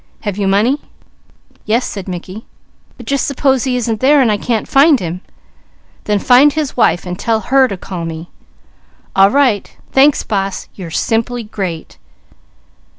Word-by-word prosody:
Have 205 -3 -3
you 200 -1 -1
money?" 220 +9 +2 0.9
"Yes," 230 +4 +1
said 195 -2 -6
Mickey, 185 +4 -7 0.5
"but 240 - -11
just 275 +3 -1
suppose 270 -2 +1
he 255 -1 0
isn't 230 -3 -2
there 285 +3 +4
and 245 -5 +3
I 210 - +1
can't 225 +1 -2
find 280 0 +4
him?" 180 0 -5 0.8
"Then 210 -1 +1
find 255 +7 +5
his 305 -3 -3
wife, 175 -8 +2
and 180 0 -6
tell 225 -1 0
her 260 +5 +3
to 195 - -5
call 180 -1 -7
me." 165 +1 -7 0.8
"All 195 0 +6
right! 255 -6 +1
Thanks, 275 +2 +4
boss! 195 -2 -3
You're 180 -4 -8
simply 230 +7 -1
great!" 190 -6 -6
220 Hz, 155 wpm, -15 LUFS, 195-260 Hz, 0.9 s, All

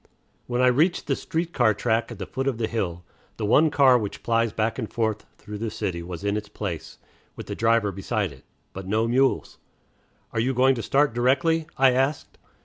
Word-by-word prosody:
When 125 +1 0
I - - +6
reached 155 +8 +2
the - - 0
street 165 +1 -3
car 110 -4 +3
track 115 +2 0
at 115 - -7
the 95 - -5
foot 135 +7 -4
of 130 -4 0
the 115 - 0
hill, 90 -7 -3 0.3
the 110 - -2
one 150 +9 +4
car 135 -4 +5
which 105 -3 -6
plies 115 -1 +1
back 110 +3 -1
and 110 - -4
forth 110 -2 -2
through 105 0 -8
the 115 0 -2
city 90 -4 -3
was 85 +1 -7
in 100 0 0
its 105 0 -4
place, 95 -6 -6 0.4
with - - -8
the - - -5
driver 115 -2 +2
beside 95 0 -2
it, 65 - -15 0.3
but 95 -1 -7
no 110 +3 +1
mules. 130 +3 +1 0.7
"Are - - -2
you 125 +3 0
going 130 +2 +4
to 120 - -4
start 140 +4 +2
directly?" 135 +7 +2
I 135 0 +5
asked. 135 +4 -1
115 Hz, 210 wpm, -25 LUFS, 105-130 Hz, 0.7 s, I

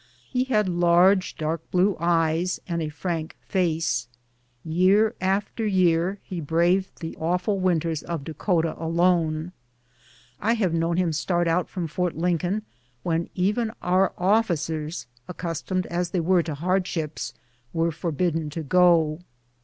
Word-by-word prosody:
lie 255 0 +2
had 215 -6 +2
large, 175 +2 +4
dark 160 +1 -3
blue 185 +2 +2
eyes, 170 +1 +1
and 170 -2 -2
a 155 - -2
frank 160 0 -4
face. 165 - 0 0.6
Year 190 +7 +3
after 195 +4 -1
year 185 -2 +2
he 180 -3 -5
braved 170 +5 +1
the 160 - -5
awful 180 +5 0
winters 165 -4 0
of 165 -4 -4
Dakota 165 +1 0
alone. 165 -1 +1 0.9
I 225 +4 +2
have 200 -7 0
known 165 +1 0
him 175 -3 +1
start 175 +3 0
out 165 +2 +1
from 180 -3 -3
Fort 175 +2 -2
Lincoln 180 +4 0 0.4
when 165 0 -1
even 210 +5 +1
our 185 +1 +2
officers, 170 -5 0 0.2
accustomed 180 +1 -3
as 175 0 -2
they 180 - -1
were 175 +2 +3
to 160 -3 -4
hardships, 170 -1 -2 0.4
were 165 0 +1
forbidden 165 -1 -1
to 160 +2 -5
go. 165 -1 +4
175 Hz, 135 wpm, -25 LUFS, 165-185 Hz, 0.9 s, large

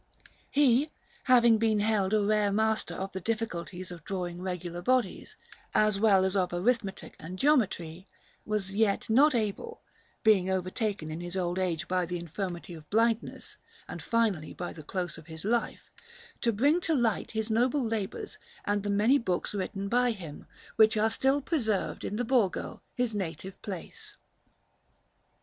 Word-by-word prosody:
He, 280 +1 +3 0.4
having 235 -3 +6
been 220 -1 +2
held 205 -2 +1
a 215 -1 +3
rare 210 0 +2
master 220 +1 +1
of 195 +1 -4
the 190 - -5
difficulties 185 -4 -3
of 170 -3 -9
drawing 180 -2 -4
regular 180 -2 -4
bodies, 255 +5 0 0.4
as 215 -2 +3
well 200 -3 +5
as 190 +1 0
of 185 -2 +1
arithmetic 195 +2 -1
and 180 +4 -7
geometry, 190 - +1 0.4
was 200 -2 -2
yet 215 0 +1
not 275 +4 +5
able 230 - -3 0.4
being 195 -4 +4
overtaken 190 -2 -2
in 155 - -5
his 175 +2 -5
old 175 0 -1
age 175 -4 -1
by 180 -1 0
the 180 +1 -3
infirmity 175 +1 -5
of 155 -2 -12
blindness, 230 +1 0 0.3
and - - -7
finally 215 -9 0
by 175 - -5
the 160 - -10
close 175 +2 -4
of 160 - -16
his 160 +1 -8
life 235 +2 -1 0.5
to 235 - +2
bring 285 - +3
to 325 -2 +1
light 230 -5 0
his 220 0 -2
noble 250 +5 +2
labours 225 - -3 0.3
and 205 0 +1
the 205 - -3
many 215 +8 +4
books 185 -5 -1
written 195 0 -3
by 245 +3 +3
him, 175 -10 -7 0.3
which 220 0 +6
are 220 +1 +3
still 270 +5 +2
preserved 225 - -1
in 205 - -3
the 245 +3 -1
Borgo, 230 -6 0
his 245 -2 0
native 185 -1 -5
place. 190 -5 -5
205 Hz, 160 wpm, -29 LUFS, 180-230 Hz, 0.5 s, having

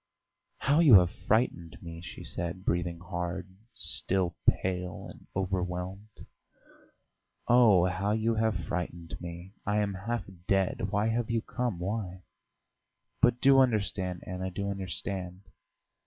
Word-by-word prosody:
"How 145 +4 +2
you 150 -10 +8
have 90 -2 +6
frightened 100 -6 0
me!" 85 -1 -8
she 85 - -9
said, 90 +2 -4
breathing 85 -1 0
hard, 90 +1 -5 0.2
still 95 -3 +1
pale 90 -1 -2
and - - -13
overwhelmed. 95 +2 -3 1.2
"Oh, 115 -7 +6
how 95 +3 -1
you 110 +2 +1
have 110 0 +1
frightened 85 -1 -4
me! 85 +2 -8
I 105 0 0
am 105 -1 +1
half 115 +5 -3 0.2
dead. 95 -1 +1
Why 105 +2 +1
have 115 0 -1
you 115 -1 0
come? 120 -7 -2
Why?" 95 0 -4 1.0
"But 120 0 +4
do 135 0 +7
understand, 100 -7 +1
Anna, 95 0 -4
do 100 +2 -3
understand 95 0 -4
95 Hz, 125 wpm, -29 LUFS, 90-110 Hz, 1.2 s, you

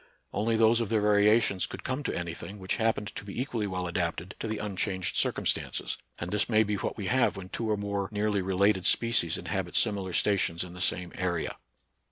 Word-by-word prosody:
Only 115 +2 +1
those 115 +1 +4
of 115 - -2
their 110 - +2
variations 105 -1 +3
could - - -8
come 130 +3 -2
to - - -2
any 85 -2 -3
thing 100 +4 -8
which 95 -2 -2
happened 110 -2 0
to - - -6
be 100 +3 -6
equally 120 -5 -1
well 90 -1 -2
adapted 85 +1 -2
to - - -3
the 110 0 -2
unchanged 95 -2 -2
circumstances - - 0
j - - -22
and 85 - -5
this 105 +2 +1
may 110 -1 +5
be 105 0 -2
what 100 - -2
we 100 - -4
have 130 +2 +2
when 90 -1 -8
two 115 +2 -3
or 105 - +2
more 100 -1 -2
nearly 105 -1 0
re 95 0 -2
lated 100 -1 +3
species 115 -9 +3
inhabit - - -3
similar 95 -3 +1
stations 95 -4 +2
in 90 -1 -9
the 90 - -8
same 90 0 0
area. 90 -3 -2
100 Hz, 220 wpm, -29 LUFS, 90-110 Hz, -, may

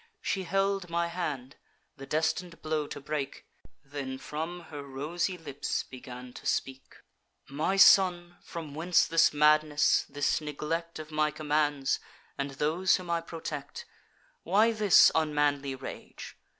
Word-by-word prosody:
She 190 - -2
held 195 0 0
my 170 0 0
hand, 145 -7 -4 0.4
the 135 -1 -10
destin'd 170 +2 -1
blow 155 -1 -1
to - - -7
break; 145 -1 -4 0.4
Then 135 -2 -5
from 160 +6 -5
her 145 -1 -6
rosy 155 +7 -3
lips 145 -4 -3
began 125 -1 -10
to - - -8
speak: 135 0 -2 0.5
'My 155 +8 -1
son, 175 -3 +5
from 160 -4 -8
whence 170 +4 +3
this 165 0 +4
madness, 150 0 +3
this 145 +2 0
neglect 160 +3 -4
Of 155 0 -8
my 155 0 +2
commands, 150 -2 0 0.4
and 140 0 -3
those 155 +7 +2
whom 180 -2 -5
I 170 0 +1
protect? 160 -4 -7 0.6
Why 220 +3 +3
this 215 -4 +6
unmanly 145 -3 +1
rage? 130 - -9
155 Hz, 135 wpm, -29 LUFS, 145-170 Hz, 0.6 s, this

